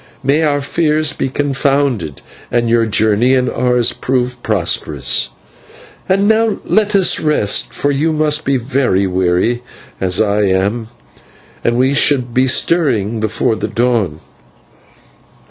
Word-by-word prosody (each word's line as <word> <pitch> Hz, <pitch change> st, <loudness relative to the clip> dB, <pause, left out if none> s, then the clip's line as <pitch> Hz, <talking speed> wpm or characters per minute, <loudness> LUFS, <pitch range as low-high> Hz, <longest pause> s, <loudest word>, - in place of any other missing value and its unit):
"May 140 Hz, +4 st, +2 dB
our 145 Hz, -2 st, +1 dB
fears 155 Hz, 0 st, 0 dB
be 135 Hz, -, -3 dB
confounded, 135 Hz, -, -1 dB, 0.3 s
and 120 Hz, -1 st, 0 dB
your 115 Hz, -1 st, +2 dB
journey 110 Hz, +4 st, +2 dB
and 130 Hz, -1 st, +1 dB
ours 125 Hz, -1 st, +1 dB
prove 125 Hz, -1 st, -2 dB
prosperous. 100 Hz, -8 st, -1 dB, 0.8 s
And 195 Hz, +2 st, +2 dB
now 220 Hz, 0 st, +2 dB
let 210 Hz, -1 st, +1 dB
us 190 Hz, -2 st, +3 dB
rest, 150 Hz, -10 st, 0 dB
for 145 Hz, -, -1 dB
you 150 Hz, +4 st, 0 dB
must 155 Hz, 0 st, 0 dB
be 135 Hz, 0 st, +1 dB
very 120 Hz, -6 st, 0 dB
weary, 95 Hz, +6 st, 0 dB, 0.4 s
as 90 Hz, -1 st, 0 dB
I 105 Hz, -1 st, +1 dB
am, 100 Hz, +4 st, 0 dB, 0.8 s
and 120 Hz, 0 st, +1 dB
we 130 Hz, +2 st, +2 dB
should 130 Hz, -4 st, +1 dB
be 130 Hz, +2 st, +2 dB
stirring 120 Hz, -, 0 dB
before 110 Hz, +1 st, -1 dB
the -, -, -3 dB
dawn." 115 Hz, -10 st, -1 dB
125 Hz, 130 wpm, -15 LUFS, 110-145 Hz, 0.8 s, us